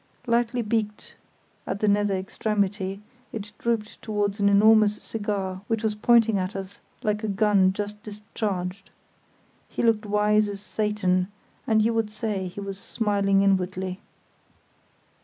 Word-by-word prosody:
Lightly 240 0 +1
beaked 210 -1 -2 0.5
at 195 - -2
the 215 - +1
nether 205 -1 +2
extremity, 195 0 -2 0.3
it 210 -1 -6
drooped 230 -2 -2
towards 205 -1 -1
an 200 0 +4
enormous 210 +1 +5
cigar 200 -4 -3
which 225 -1 -1
was 220 -1 +1
pointing 225 -1 +4
at 185 +1 -3
us 195 0 -7 0.2
like 210 -1 0
a - - 0
gun 200 -2 +3
just 205 +1 -5
discharged. 200 -3 -4 0.8
He - - -3
looked 220 -2 +2
wise 210 0 +3
as 200 -1 -5
Satan, 205 -3 0 0.4
and 220 -1 +4
you 230 +1 +2
would 225 -2 0
say 210 -3 -3
he 180 - -8
was 195 -1 -6
smiling 200 -2 +1
inwardly. 185 0 0
210 Hz, 140 wpm, -25 LUFS, 195-215 Hz, 0.8 s, enormous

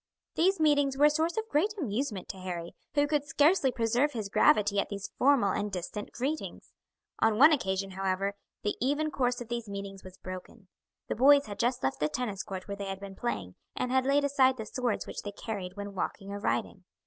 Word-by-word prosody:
These 380 +3 +2
meetings 285 -3 +3
were 290 - +6
a 300 - +6
source 320 +5 0
of 445 0 -1
great 420 +3 +1
amusement 235 - -2
to 195 - -6
Harry, 175 -2 -5 0.2
who 290 0 +4
could 295 -1 +1
scarcely 290 -1 +3
preserve 245 +5 +1
his 215 -4 -4
gravity 205 0 +4
at - - -1
these 200 -1 -6
formal 255 -7 +4
and 205 +2 -2
distant 190 +3 -5
greetings. 285 +6 -4 0.5
On 225 -1 +3
one 295 +6 +8
occasion, 195 -7 -1
however, 195 +1 -1 0.3
the 205 - 0
even 290 +4 +1
course 245 -3 0
of 240 - -6
these 235 -2 -4
meetings 200 -1 -6
was 185 -1 -12
broken. 185 +2 -9 0.4
The - - -1
boys 280 +4 +6
had 205 -1 -8
just 245 +1 0
left 135 0 0
the 150 - +1
tennis 205 0 -3
court 190 -3 -7
where 200 -1 -5
they 200 - -4
had 195 0 -4
been 195 -1 -8
playing, 140 - -3 0.2
and 250 - -2
had 260 0 +2
laid 285 +1 +3
aside 265 -2 +3
the 220 - -5
swords 240 -1 -2
which - - -6
they 205 - -5
carried 195 -4 -5
when 200 0 -6
walking 195 +1 -4
or 200 - -4
riding. - - -2
225 Hz, 210 wpm, -30 LUFS, 195-280 Hz, 0.5 s, one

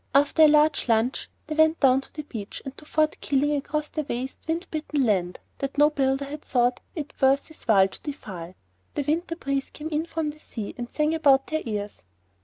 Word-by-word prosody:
After 285 +3 +4
a 310 - +10
large 300 -3 +3
lunch 230 +3 +1 0.2
they 310 - -4
went 315 +1 +4
down 265 -1 +5
to - - -18
the 300 - -6
beach 220 -8 -7
and 270 0 -6
to 305 - -15
Fort 310 0 0
Keeling 290 +1 +1
across 300 +2 -2
the 310 - -2
waste, 260 -2 -4
wind 330 +3 -1
bitten 300 -3 0
land 180 -5 0 0.2
that 275 0 -4
no 295 +1 +6
builder 270 -1 +1
had 295 +2 -7
thought 245 -3 +1 0.2
it 300 -4 -5
worth 270 +3 +3
his 315 - -15
while 195 -4 +5
to 190 - -13
defile. 190 - -7 0.4
The 290 - 0
winter 330 +4 -1
breeze 275 -4 -2
came 310 +1 -7
in 315 +1 -1
from 320 -3 -2
the 305 - -17
sea 220 -8 -6
and 240 -1 -6
sang 305 +1 +1
about 280 -4 +4
their 315 0 -2
ears. 205 -2 -4
280 Hz, 210 wpm, -25 LUFS, 255-305 Hz, 0.4 s, a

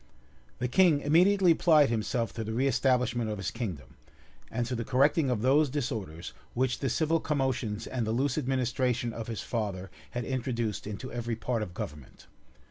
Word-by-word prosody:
The 125 - -1
king 160 +1 +4
immediately 180 +5 +4
applied 155 -4 +5
himself 115 +1 -1
to 115 - -4
the 110 +1 -4
reestablishment 125 -2 +1
of 105 - -3
his 95 -3 -3
kingdom, 90 - -6 0.5
and 120 +1 -1
to 125 - -4
the 115 -1 -2
correcting 140 +4 +3
of 120 -3 -1
those 140 +3 +4
disorders 110 - -4 0.2
which 130 +1 0
the 135 - -1
civil 160 +5 +1
commotions 130 -8 -1
and 120 -4 -2
the - - 0
loose 130 +3 +1
administration 125 -3 0
of 115 -1 -6
his 115 -3 -4
father 95 -5 -3 0.2
had 120 -1 -4
introduced 120 -5 -2
into 105 +5 -6
every 120 -1 -3
part 115 0 -2
of 90 -4 -5
government. 75 -3 -8
120 Hz, 170 wpm, -29 LUFS, 110-135 Hz, 0.5 s, applied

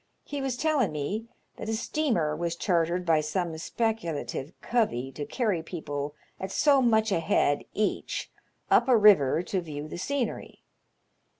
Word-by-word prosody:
He 285 -1 -5
was 265 -2 -2
tellin' 295 -6 +2
me 195 +10 -3 0.3
that - - -5
a 225 - 0
steamer 220 - 0
was 170 +1 -2
chartered 175 0 +1
by 160 -2 +4
some 165 +2 -2
speculative 165 - -2
covey 135 - 0
to 145 +2 -6
carry 210 - 0
people 145 -4 -5 0.2
at 190 - -4
so 280 +2 +4
much 220 -3 +3
a 175 - +2
head 145 -3 +1
each 210 0 -1 0.4
up 235 - +5
a 250 -3 +6
river 180 -8 +5
to 190 0 -2
view 150 -3 -6
the 165 - -7
scenery. 265 +2 -3
180 Hz, 155 wpm, -28 LUFS, 155-230 Hz, 0.4 s, a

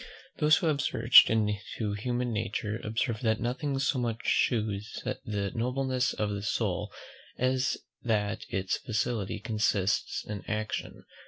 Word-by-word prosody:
Those 150 +1 +5
who - - -2
have 150 -3 +2
searched 115 -3 +7
into 105 0 -1
human 120 +3 -2
nature, 105 0 -2
observe 110 +1 -1
that 110 -2 +1
nothing 135 +3 -2
so 135 0 +1
much 115 -1 -2
shews 105 -2 0
the 105 -6 -3
nobleness 130 +2 0
of 105 -1 -1
the 100 -1 -3
soul 105 - -1 0.5
as 130 +1 +1 0.2
that 105 -3 0
its 95 0 -1
felicity 110 -2 -2
consists 105 -3 0
in 105 -2 -5
action. 110 0 -3
110 Hz, 135 wpm, -29 LUFS, 105-125 Hz, 0.5 s, searched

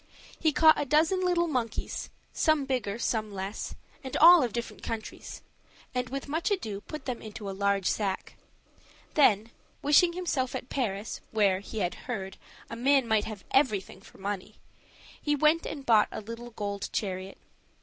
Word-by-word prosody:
He 315 - +3
caught 315 0 +6
a - - -1
dozen 315 +6 +3
of 370 - 0
little 350 -1 +2
monkeys, 250 -7 -3 0.2
some 310 -4 +2
bigger, 245 -6 -1
some 220 -3 -1
less, 195 +1 -5 0.3
and 260 - -3
all 345 +1 +9
of 245 -3 0
different 235 +1 -5
colors, 225 -1 -6 0.5
and 250 0 -2
with 275 +2 -5
much 320 +4 -1
ado 220 - -2
put 305 +3 -8
them 250 -3 -3
into 215 -1 -8
a - - -2
large 200 0 0
sack; 195 -2 -1 0.8
then, 225 -6 +4 0.3
wishing 320 +4 +5
himself 325 -8 -1
at 250 - -5
Paris, 215 -5 -3
where, 200 -4 +2
he 205 +2 -5
had 175 -1 0 0.2
heard, 195 -5 -4 0.3
a - - -7
man 265 +1 +3
might 220 -2 +2
have 215 -4 -7
everything 210 -9 +1
for - - -17
money, 195 -1 -5 0.7
he 295 -1 +1
went 305 +3 +3
and 280 -3 -6
bought 220 -3 +5
a - - -5
little 230 +3 -8
gold 205 -3 -4
chariot. 190 -1 -3
235 Hz, 170 wpm, -29 LUFS, 205-290 Hz, 0.8 s, all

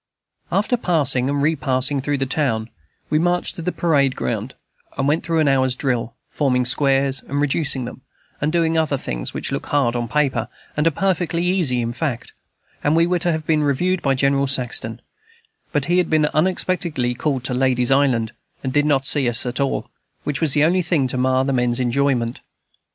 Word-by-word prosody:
After 210 +5 +1
passing 140 - +1
and 140 0 -1
repassing 140 -3 +1
through 145 +1 -1
the 135 - -1
town, 125 -5 -1 0.4
we 155 - +3
marched 175 +1 +1
to - - -6
the 180 +2 -2
parade 140 -7 +1
ground, 115 +2 -4 0.4
and 135 - 0
went 150 +3 +1
through 165 -1 -1
an 155 -2 +2
hour's 130 -2 +2
drill, 120 -4 -2
forming 125 -4 0
squares 135 +1 +2
and 140 +1 -2
reducing 145 -2 +1
them, 125 - -9 0.4
and 150 +2 0
doing 165 -1 +1
other 150 -3 0
things - - -5
which - - -2
look - - -4
hard 135 -5 +1
on 120 -1 -2
paper, 140 +2 0 0.3
and 150 +2 +1
are - - +6
perfectly 175 0 -1
easy 170 -10 +3
in 115 +1 -3
fact; 135 -3 -4 0.5
and 145 +2 +2
we 165 +1 +4
were 175 0 0
to 175 +1 +1
have 155 -1 -3
been 155 -1 +1
reviewed 175 +6 0
by 135 -1 +1
General 140 +1 +1
Saxton, 125 -4 -1 0.7
but 145 -2 0
he 175 +1 +2
had 180 - 0
been 155 -1 +3
unexpectedly 170 -6 0
called 130 0 -2
to 130 - -2
Ladies 125 -1 +1
Island, 130 -5 +2 0.3
and 130 -1 -3
did 145 +1 +2
not 135 -3 +1
see 135 -3 +5
us 120 +1 +4
at 125 +2 -3
all, 140 -1 -2 0.3
which 145 +1 -3
was 155 -4 +3
the 150 - +3
only 180 +4 +3
thing 165 -5 +1
to 130 - -1
mar 130 +1 +2
the 135 - -1
men's 125 -1 +2
enjoyment. 125 -1 0
140 Hz, 195 wpm, -20 LUFS, 130-160 Hz, 0.7 s, are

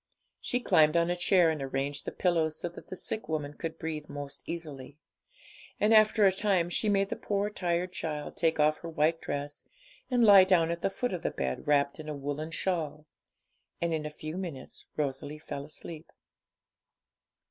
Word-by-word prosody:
She 245 - -1
climbed 155 -9 +4
on 170 +1 +2
a - - +1
chair 175 -1 +4
and 155 -3 -4
arranged 135 +1 -3
the - - -3
pillows, 165 -4 +1
so 175 - -3
that 170 - -12
the - - -6
sick 215 +2 -3
woman 150 -2 -2
could 160 +2 -5
breathe 155 -2 -5
most 145 -1 -7
easily. 150 -5 -7 0.8
And 215 +2 +4
after 215 -1 +6
a 195 - +6
time 190 -3 +1
she 215 - 0
made 195 -1 +2
the - - -2
poor 205 0 -1
tired 175 -2 -1
child 150 -4 -4
take 165 -2 +1
off 155 +1 +3
her 170 - -7
white 160 +1 +1
dress, 145 +1 -4 0.5
and 245 -2 +3
lie 200 -3 +9
down 175 -3 +3
at 170 0 -4
the - - +1
foot 245 +4 -2
of 175 - -3
the - - 0
bed, 65 - -3
wrapped 140 0 +2
in 155 0 -7
a 150 - -3
woollen 145 +3 -4
shawl. 155 -3 -2 0.7
And 170 -1 0
in 155 -1 -2
a - - -5
few 155 +2 -7
minutes 170 -8 -7
Rosalie 145 0 -2
fell 140 -2 -6
asleep. 155 +1 -8
160 Hz, 190 wpm, -30 LUFS, 150-180 Hz, 0.8 s, lie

